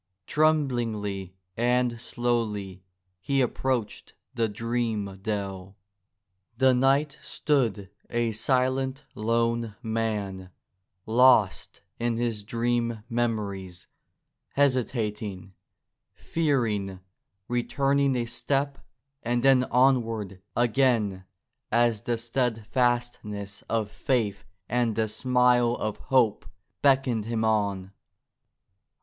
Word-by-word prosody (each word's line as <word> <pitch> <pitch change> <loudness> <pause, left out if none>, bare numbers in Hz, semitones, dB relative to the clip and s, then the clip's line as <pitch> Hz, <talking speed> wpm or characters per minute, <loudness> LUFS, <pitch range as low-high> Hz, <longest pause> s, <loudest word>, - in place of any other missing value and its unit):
Trem 155 +2 +3
blingly 105 -6 -3 0.2
and 120 0 +1
slowly 110 -6 -2 0.4
he 135 +9 0
approached 125 -3 -1 0.2
the 115 -2 0
dream 110 -3 -2
dell. 95 -2 -4 0.8
The 130 0 +5
knight 140 +3 +2
stood 115 -10 0 0.2
a 120 -1 0
silent, 130 +4 0
lone 115 0 0
man, 105 -5 -2 0.6
lost 115 -4 +3 0.2
in 120 -1 0
his 115 -3 -1
dream 115 0 -1
memories, 105 -6 -2 0.7
hesitating, 110 -8 -1 0.6
fearing, 115 - -1 0.5
returning 135 +3 +1
a 120 -1 0
step 135 +4 -1 0.4
and 120 +1 0
then 135 -2 +5
onward 115 -7 +1
again 115 -6 +2 0.5
as 120 -2 +3
the 120 -1 -1
steadfastness 115 -3 -1
of 110 -2 -1
faith 110 -7 -1 0.2
and 120 -2 +1
the 110 -1 +1
smile 125 0 +3
of 110 -3 -3
hope 125 -8 +1 0.3
beckoned 130 -6 +3
him 115 -1 -1
on. 100 -3 0
115 Hz, 90 wpm, -27 LUFS, 105-125 Hz, 0.8 s, The